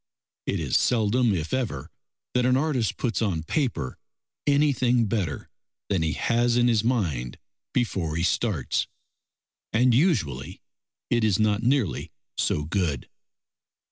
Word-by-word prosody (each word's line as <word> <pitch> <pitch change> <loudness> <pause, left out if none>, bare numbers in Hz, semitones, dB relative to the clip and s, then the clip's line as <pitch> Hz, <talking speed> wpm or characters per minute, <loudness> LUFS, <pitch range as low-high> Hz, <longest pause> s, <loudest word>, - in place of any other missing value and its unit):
It - - 0
is - - +1
seldom 120 0 +2
if 80 -2 -3
ever 115 - -2 0.4
that 125 - +2
an 125 +1 +3
artist 135 - 0
puts 120 -3 -1
on 90 -8 0
paper 85 - -2 0.5
anything 130 -5 +3
better 95 - -2 0.4
than 95 -4 +1
he 80 -1 0
has 120 0 +1
in 120 0 +4
his 115 -3 +3
mind 85 - -1 0.3
before 95 -10 -1
he 85 - 0
starts, 95 - 0 0.8
and 120 +2 +4
usually 90 - +1 0.5
it 120 -1 +3
is 105 -4 +3
not 110 -1 +2
nearly 120 - 0 0.2
so 75 - 0
good. 80 -4 -2
110 Hz, 130 wpm, -25 LUFS, 80-125 Hz, 0.8 s, in